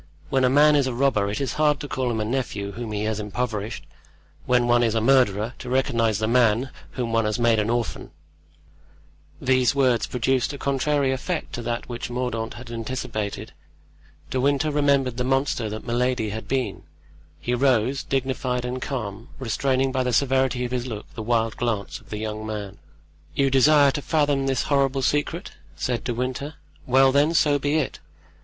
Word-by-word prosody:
When 135 -1 +2
a 125 - +5
man 150 +3 +5
is 140 -2 +3
a 125 - -3
robber 120 -6 +2
it 105 - -3
is 135 - -2
hard 150 -2 +3
to 145 - -5
call 130 -2 -1
him 110 -1 -2
nephew 105 -6 -2
whom 115 +2 -6
he 105 0 -2
has 110 0 -1
impoverished; 105 0 -3 0.6
when 125 -1 +3
one 120 0 +4
is 115 -2 +1
a - - +3
murderer, 115 -3 +3
to 125 - -7
recognize 115 -4 +1
the 110 +1 -1
man 120 +1 +3 0.2
whom 120 -3 -3
one 115 -1 +2
has 105 -1 0
made 115 -2 +3
an 105 +1 0
orphan." 120 -1 -2 1.3
These 130 0 +2
words 125 -5 +2
produced 130 +3 0
a - - -6
contrary 140 0 +1
effect 155 +6 -3
to 120 - -4
that 120 0 -3
which 120 -1 -5
Mordaunt 120 -2 -3
had 120 -1 -10
anticipated. 115 -3 -4 0.8
De 130 - 0
Winter 140 +3 +2
remembered 140 -4 +2
the 125 - 0
monster 135 -3 0
that 110 +1 -6
Milady 120 -2 0
had 110 +1 -6
been; 130 -7 -1 0.6
he 120 - -2
rose, 130 +1 +2
dignified 130 -2 -1
and 125 +1 -4
calm, 115 -3 -5
restraining 130 +1 0
by 130 0 0
the 125 -1 0
severity 130 -1 +2
of 120 - -5
his 125 0 -2
look 110 -4 -7
the 110 - -6
wild 115 0 0
glance 115 -4 -2
of - - -22
the 105 - -4
young 110 0 -4
man. 105 -2 -6 0.6
"You 135 -1 +2
desire 140 +1 +6
to 145 - -4
fathom 145 -3 +1
this 135 -3 +1
horrible 135 -1 +1
secret?" 150 +7 -1 0.2
said 120 -3 -2
De 125 - -2
Winter; 130 +5 -3 0.3
"well, 135 +1 +5
then, 145 +4 +3
so 145 -2 +3
be 145 +2 0
it. 155 -3 -1
125 Hz, 185 wpm, -24 LUFS, 115-135 Hz, 1.3 s, desire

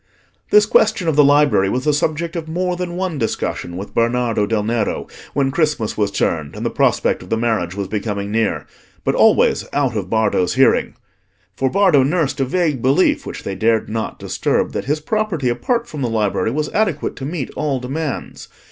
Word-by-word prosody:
This 210 0 +6
question 215 -3 +2
of 160 - +2
the 150 - +6
library 145 -9 +4
was 125 +5 -1
the 150 - +2
subject 160 +3 -1
of 165 -2 -4
more 180 +2 -1
than 175 -1 -4
one 180 -5 -2
discussion 90 -5 -3
with 100 +2 -7
Bernardo 115 -2 +1
del 110 -1 0
Nero 110 -1 -1 0.3
when 135 -1 +1
Christmas 150 -8 0
was 105 -2 +1
turned 80 -7 -1
and - - -5
the - - 0
prospect - - +1
of 90 - -12
the 115 - +1
marriage 110 -6 -1
was 100 -1 -3
becoming 100 -1 -3
near—but 110 +1 -3
always - - +4
out 135 -5 0
of 95 -4 -3
Bardo's 105 -5 +1
hearing. - - +3 0.6
For 130 +4 0
Bardo 185 -6 +4
nursed 150 +1 0
a 135 - +2
vague 150 -3 0
belief, 135 +9 +2
which - - -7
they 100 - -4
dared 110 +3 +1
not 110 0 -3
disturb, - - -1
that - - -4
his 150 +3 0
property, 185 - -1
apart 235 - -1
from 150 -8 -7
the 125 - 0
library, 110 -1 0
was 150 +5 -2
adequate 185 -9 0
to 135 - -5
meet 150 -2 -4
all 145 -3 -1
demands. 135 +4 -5
135 Hz, 190 wpm, -19 LUFS, 110-160 Hz, 0.6 s, This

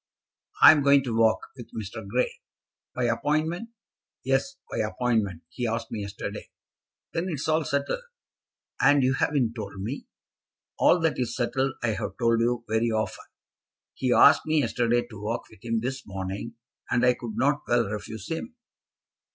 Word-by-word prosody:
"I - - +12
am 155 -2 +3
going 140 -1 +5
to 120 -4 -3
walk, 115 -1 +3
with 120 -4 -10
Mr. 110 0 -6
Grey." 125 +5 -1 0.5
"By 125 - -1
appointment?" 155 - 0 0.5
"Yes, 135 - 0 0.2
by - - -2
appointment. 110 -5 0
He 120 +8 -3
asked 115 0 -3
me 110 - -3
yesterday." 100 0 -6 0.6
"Then 165 +3 -1
it's 150 -4 -3
all 160 0 +2
settled, 140 - -1 0.8
and 145 -1 +5
you 130 +1 +3
haven't 135 -4 +1
told 100 -4 -7
me!" 115 +9 -5 0.7
"All 180 - +5
that 165 -4 +1
is 120 -2 -1
settled 130 +2 0
I 120 - +2
have 105 -3 -3
told 115 -1 +2
you 120 0 0
very 110 +2 +1
often. 110 -1 -2 0.7
He 130 - -1
asked - - +6
me 155 -1 +3
yesterday 120 -2 +1
to 110 -4 -11
walk 110 +3 -2
with 110 - -18
him 115 -1 -1
this 130 +2 -3
morning, 100 +4 -5 0.3
and 120 0 +2
I 125 - +5
could 120 -3 -7
not 145 +2 +2
well 120 -1 +3
refuse 105 +1 -6
him." 200 +9 -5
120 Hz, 165 wpm, -26 LUFS, 110-140 Hz, 0.8 s, I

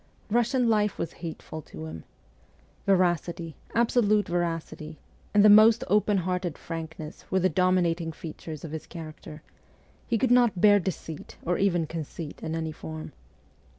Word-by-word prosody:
Russian 240 +2 +2
life 210 -3 +2
was - - -3
hateful 160 -2 -6
to 80 - -9
him. 80 0 -8 0.8
Veracity 175 -3 +1 0.2
absolute 225 -3 +3
veracity 165 -2 -3 0.3
and 205 0 +5
the - - +10
most 215 +2 +7
open 210 +1 +3
hearted 180 -2 -2
frankness 160 -2 -7
were 190 - +2
the 185 +1 +3
dominating 175 -1 +1
features 160 -1 -8
of 160 - -6
his 160 -1 -6
character; 155 -2 -9 0.6
he 235 - +1
could 250 +2 +1
not 240 -6 +4
bear 205 +1 +6
deceit 165 -4 -6
or 175 +1 0
even 175 -4 +2
conceit 160 0 -7
in 160 - -3
any 160 -1 -2
form. 155 0 -8
175 Hz, 145 wpm, -27 LUFS, 160-205 Hz, 0.8 s, the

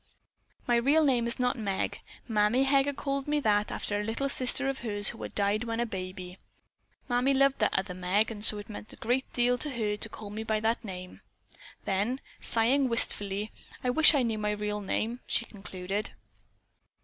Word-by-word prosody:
My 240 -1 +3
real 285 +7 +3
name 250 -5 +2
is 235 - +1
not 250 -1 0
Meg. 200 -3 -2 0.3
Mammy 220 +3 +2
Heger 275 +1 +3
called 275 0 -3
me 295 0 +1
that 210 -4 +1
after 205 0 -2
a - - -2
little 230 +6 -2
sister 265 +1 +1
of 270 0 -2
hers 205 -3 0
who 225 - -9
had - - -7
died 205 +3 +1
when 230 0 -3
a 240 - +1
baby. 185 -3 -7 0.7
Mammy 250 +2 +2
loved 275 0 +3
that - - +1
other 190 -1 -2
Meg 185 +5 0
and 210 -2 -7
so 215 - +8
it 205 +1 -8
meant 215 0 -9
a - - -11
great 255 +3 -1
deal 245 0 +1
to 300 - -1
her 215 -5 -2
to 220 - 0
call 210 -1 -9
me 215 +1 -5
by 220 -1 0
that 225 +2 0
name." 185 -3 -8 0.6
Then, 205 +7 0 0.2
sighing 255 +4 +2
wistfully: 205 -2 +2 0.3
"I 250 - +1
wish 310 +3 +6
I 270 - +3
knew 225 -2 -1
my 210 0 -1
real 210 0 -3
name," 225 +4 -2
she 235 - +1
concluded. 195 -1 -5
225 Hz, 195 wpm, -29 LUFS, 205-250 Hz, 0.7 s, so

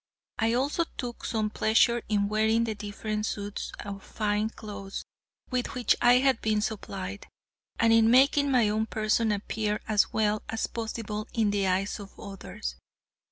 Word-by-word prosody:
I 225 0 +2
also 280 +7 +1
took 245 -3 -5
some 215 -2 -1
pleasure 235 +2 +3
in 205 -2 +2
wearing 220 +2 +2
the 225 -1 -1
different 210 +1 -3
suits 205 0 -4
of 200 -1 -6
fine 210 0 -1
clothes 200 -3 -7 0.5
with 250 0 -1
which 250 -1 +3
I 245 0 +7
had 260 -1 +3
been 215 -1 +1
supplied, 200 -2 -5 0.5
and 230 -1 +5
in 225 0 +6
making 280 +3 +5
my 245 -5 +4
own 215 +1 0
person 220 +1 +1
appear 210 +1 -1
as 215 -2 +3
well 215 -1 +1
as 225 - -1
possible 220 -2 -4
in 220 -3 +2
the 200 -1 +1
eyes 190 +3 0
of 200 -1 -11
others. 195 - -7
215 Hz, 160 wpm, -28 LUFS, 205-230 Hz, 0.5 s, I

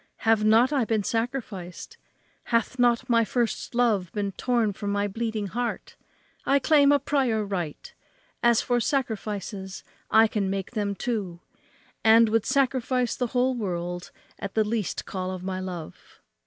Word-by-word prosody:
have 220 -1 +4
not 225 +6 +4
I 270 -4 +2
been 220 -2 0
sacrificed? 225 - -4 0.5
hath 235 +2 0
not 245 +1 +3
my 230 -2 +4
first 235 +1 -2
love 215 -8 +2
been 205 -2 -2
torn 230 0 0
from 200 +1 -4
my 205 0 0
bleeding 220 0 -3
heart? 235 +5 -4 0.5
I 275 - +3
claim 285 +1 +4
a 290 - +6
prior 260 -6 0
right. 175 -7 -5 0.5
As 235 -1 +4
for 245 0 +1
sacrifices, 210 -6 -3 0.3
I 220 +1 +6
can 205 -3 -1
make 195 -1 -3
them 205 -4 -2
too, 200 -7 -3 0.6
and 225 0 +6
would 225 -1 +1
sacrifice 255 -2 +1
the 250 - -1
whole 255 +1 +3
world 175 -5 -4 0.3
at 200 - -6
the 220 - +4
least 210 -2 -2
call 185 -1 -4
of 185 -1 -5
my 185 0 -3
love." 180 -4 -8
220 Hz, 155 wpm, -26 LUFS, 195-245 Hz, 0.6 s, a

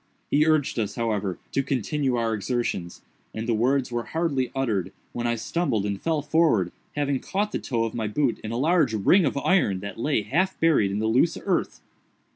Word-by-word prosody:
He 150 +2 +4
urged 155 -6 +2
us, 105 -2 -2
however, 105 -6 -1
to 135 - +1
continue 135 0 -1
our 115 -1 0
exertions, 105 -5 -3 0.3
and 110 +1 -4
the 120 - +2
words 125 +4 +1
were 120 0 -1 0.2
hardly 140 -7 0
uttered 105 -9 -1 0.2
when 120 0 -2
I 120 - +1
stumbled 115 - -1
and 100 -1 -3
fell 160 -3 0
forward, 145 - +2 0.2
having 140 -2 0
caught 205 +8 -2
the - - -2
toe 115 -4 -1
of 115 - -3
my 110 -2 -2
boot 125 +4 0
in 110 - -6
a 115 - -2
large 150 -4 +2
ring 165 - +4
of 140 - -1
iron 140 - +2
that 100 +2 -7
lay 120 -3 +1
half 175 - 0
buried 155 -12 +3
in 100 - -2
the 110 - -1
loose 130 +9 +2
earth. - - -1
120 Hz, 200 wpm, -25 LUFS, 110-150 Hz, 0.3 s, He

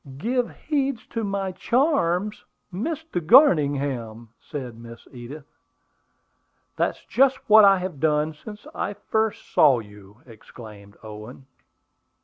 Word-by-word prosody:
"Give 245 - -1
heed 275 -4 -2
to 230 - -3
my 195 -2 -2
charms, 210 - 0 0.3
Mr. 305 - -4
Garningham!" 140 - +3
said 130 -5 -7
Miss 115 0 -13
Edith. 130 +4 -10 1.3
"That's - - -2
just 265 0 +3
what 215 0 +8
I 195 -1 +6
have 180 -5 -6
done 150 +1 +1
since 210 +7 -12
I 205 - -4
first 220 +1 -3
saw 140 -5 +5
you!" 105 0 -13
exclaimed 105 -3 -14
Owen. 110 +5 -10
155 Hz, 115 wpm, -23 LUFS, -, 1.3 s, what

